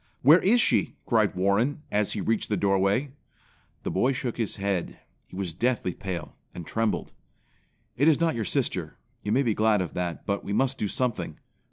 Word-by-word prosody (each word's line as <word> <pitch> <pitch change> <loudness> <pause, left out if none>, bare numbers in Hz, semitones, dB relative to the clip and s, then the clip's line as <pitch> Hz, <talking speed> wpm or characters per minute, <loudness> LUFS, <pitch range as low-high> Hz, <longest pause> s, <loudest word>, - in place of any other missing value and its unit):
"Where 155 +7 +7
is 230 +6 +4
she?" - - +2
cried - - +2
Warren 105 - +1
as 105 -1 +1
he 105 - -3
reached 110 +2 0
the 105 - +1
doorway. 100 +7 +1 0.7
The - - -2
boy 125 +8 +2
shook 125 -2 -3
his 115 -3 -1
head. 100 -3 -2 0.3
He - - -13
was 95 -3 -3
deathly 115 -2 0
pale, 90 -4 -6 0.2
and 85 - -7
trembled. 115 +4 -1 0.8
"It 140 +5 +3
is 155 -3 +5
not 165 -1 +2
your 115 -2 -2
sister; - - -2 0.2
you 105 - -3
may 130 +5 +3
be 115 -4 +1
glad 110 0 +3
of 90 -3 -3
that; 90 -2 -3
but 100 0 -1
we 100 - -4
must 135 +4 +1
do 105 - 0
something. 125 +2 -2
105 Hz, 190 wpm, -26 LUFS, 95-130 Hz, 0.8 s, Where